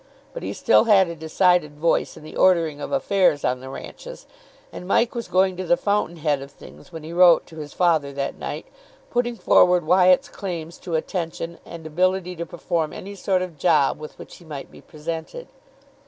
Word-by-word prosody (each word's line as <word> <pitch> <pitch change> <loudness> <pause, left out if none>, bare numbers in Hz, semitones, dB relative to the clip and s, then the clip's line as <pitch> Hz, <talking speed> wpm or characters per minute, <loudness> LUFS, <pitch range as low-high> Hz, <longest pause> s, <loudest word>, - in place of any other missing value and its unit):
But - - -6
he - - -4
still - - +3
had 200 -4 +5
a 170 - -6
decided 160 -1 +1
voice 165 +2 0
in - - -13
the 155 - -11
ordering 165 -5 +2
of - - -5
affairs 190 - +2
on 125 0 0
the 130 +1 -9
ranches, - - -10 0.5
and 180 - -8
Mike 230 +4 +2
was 235 -1 -5
going 185 +1 +2
to 185 - -3
the 175 -1 +2
fountain 200 -4 -1
head 150 -3 0
of 140 - -9
things 160 - -15
when 160 -2 -8
he 160 +2 -8
wrote 175 -1 +6
to 160 - -14
his 150 -1 -7
father 160 -6 +1
that 140 0 -4
night, - - -5 0.5
putting 240 0 0
forward 180 -5 +4
Wyatt's 185 - +4
claims 170 - -6
to 170 -3 -4
attention 170 0 -4
and 165 -2 -10
ability 180 +3 0
to 170 - -5
perform 170 -2 -2
any 200 +2 -8
sort 190 -1 0
of 170 -5 -9
job 150 -5 +2
with 155 0 -10
which - - -12
he - - -17
might 150 -4 -8
be - - -15
presented. 160 - -7
170 Hz, 200 wpm, -23 LUFS, 155-185 Hz, 0.5 s, wrote